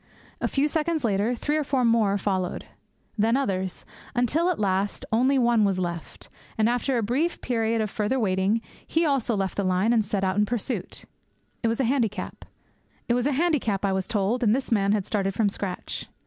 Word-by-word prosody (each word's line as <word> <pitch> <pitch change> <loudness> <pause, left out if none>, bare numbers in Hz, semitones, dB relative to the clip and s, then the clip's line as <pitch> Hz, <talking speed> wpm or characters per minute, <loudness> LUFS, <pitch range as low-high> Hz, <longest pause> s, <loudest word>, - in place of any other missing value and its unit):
A - - +1
few 280 +2 +1
seconds 315 0 -1
later, 215 +2 +1
three 295 +6 -1
or 305 - +1
four 265 -3 +1
more 220 -4 +3
followed; 190 -2 -2 0.5
then 225 +4 +3
others; 190 -8 -2 0.3
until 275 +9 +2
at 360 - 0
last 195 0 -1
only 255 +5 +3
one 235 -3 +3
was 195 -2 +2
left; 170 -3 -5 0.3
and, 220 0 +3
after 245 +2 +1
a 230 - 0
brief 275 +11 0
period 225 -2 0
of 215 - -1
further 220 +5 0
waiting, 195 +1 +1 0.3
he 330 +1 +1
also 270 -6 +1
left 195 -2 -2
the 200 - +1
line 185 +5 +2
and 225 -2 +3
set 200 -1 -2
out 190 +1 0
in 210 - +4
pursuit. 230 -3 -4 0.6
It 230 - +1
was 230 +2 0
a - - +3
handicap, 225 -6 -1 0.7
I 245 - +1
was 190 0 -1
told, 220 +2 0
and 225 -1 +4
this 265 -1 -4
man 200 -3 +3
had 205 -3 +1
started 195 -2 -1
from 215 -3 +2
scratch. 195 -2 -5
225 Hz, 185 wpm, -25 LUFS, 195-255 Hz, 0.7 s, in